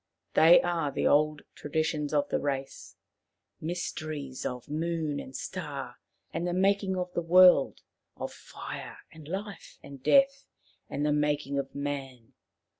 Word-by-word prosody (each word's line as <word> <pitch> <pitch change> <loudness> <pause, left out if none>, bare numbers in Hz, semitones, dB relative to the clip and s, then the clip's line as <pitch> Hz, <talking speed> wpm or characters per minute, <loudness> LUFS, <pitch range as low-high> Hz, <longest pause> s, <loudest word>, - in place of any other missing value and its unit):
They 165 +2 +8
are 170 -5 0
the - - -2
old 150 0 +3
traditions 150 0 -2
of 145 -2 +1
the - - 0
race; 135 -1 -4 0.7
myster 160 -2 -4
ies 135 -3 -5
of 125 -1 -6
moon 155 -1 -2
and 130 - -9
star 140 -9 -5 0.4
and 170 +2 -2
the 175 - -1
making 195 0 +2
of 180 0 -3
the - - 0
world, 180 -3 +6 0.4
of - - -5
fire - - -8
and 155 -2 -13
life 195 +3 -6
and 140 -2 -11
death, 275 - +4 0.4
and 145 +1 -2
of 150 - +2
the 150 - +2
making 145 -1 0
of 135 0 -5
man. 135 -4 -5
150 Hz, 150 wpm, -29 LUFS, 140-175 Hz, 0.7 s, They